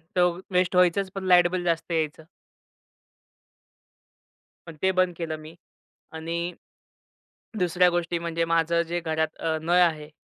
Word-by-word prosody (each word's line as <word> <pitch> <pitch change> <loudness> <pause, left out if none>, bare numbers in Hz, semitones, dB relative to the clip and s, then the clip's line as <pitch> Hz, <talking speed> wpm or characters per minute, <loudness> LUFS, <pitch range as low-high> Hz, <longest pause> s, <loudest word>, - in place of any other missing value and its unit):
तर 180 -1 +2
वेस्ट 180 0 +1
व्हायचंच 180 +2 +3
पण 195 - -4
लाईट 175 -1 +6
बिल 185 -1 -2
जास्त 170 0 -1
यायचं. 160 -1 -2 2.4
पण 165 - -9
ते 190 - +3
बंद 185 -1 +1
केलं 160 -2 -4
मी 155 +2 -12 0.6
आणि 170 +2 -4 1.1
दुसऱ्या 180 0 +3
गोष्टी 175 0 -1
म्हणजे 170 0 -2
माझं 165 0 +2
जे 175 +1 -2
घरात 160 -1 -2
अ, 160 -1 -1
नळ 170 +3 +2
आहे. 155 -4 +1
170 Hz, 135 wpm, -25 LUFS, 165-180 Hz, 2.4 s, लाईट